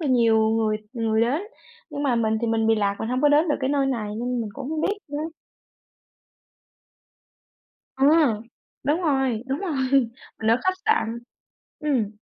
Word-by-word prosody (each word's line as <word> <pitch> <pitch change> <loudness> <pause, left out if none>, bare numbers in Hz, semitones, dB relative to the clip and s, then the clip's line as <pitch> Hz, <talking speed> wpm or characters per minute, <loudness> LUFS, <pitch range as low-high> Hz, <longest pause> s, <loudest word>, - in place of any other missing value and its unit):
là 315 - -2
nhiều 225 -3 +4
người 220 -1 +1 0.2
người 225 -3 0
đến, 255 +9 +1 0.5
nhưng 290 -1 -4
mà 270 -4 +2
mình 220 -1 +1
thì 235 - -1
mình 225 -1 +1
bị 225 - +4
lạc, 200 -2 0
mình 220 - -3
hông 250 +1 0
có 295 - +6
đến 300 +3 +4
được 295 - +2
cái 260 0 0
nơi 280 -1 +2
này 230 -6 -2
nên 245 +2 -2
mình 220 -2 -4
cũng 280 0 -6
hông 315 -1 -2
biết 405 +5 0
nữa. 290 0 -4 2.8
Ừm, 275 -5 +4 0.4
đúng 295 +5 +1
rồi, 270 -8 +1
đúng 270 +1 -2
rồi, 345 -6 -3 0.6
mình 220 0 +1
ở 230 - +5
khách 375 - +1
sạn, 235 - +1 0.6
ừm. 260 -9 0
250 Hz, 175 wpm, -24 LUFS, 225-290 Hz, 2.8 s, có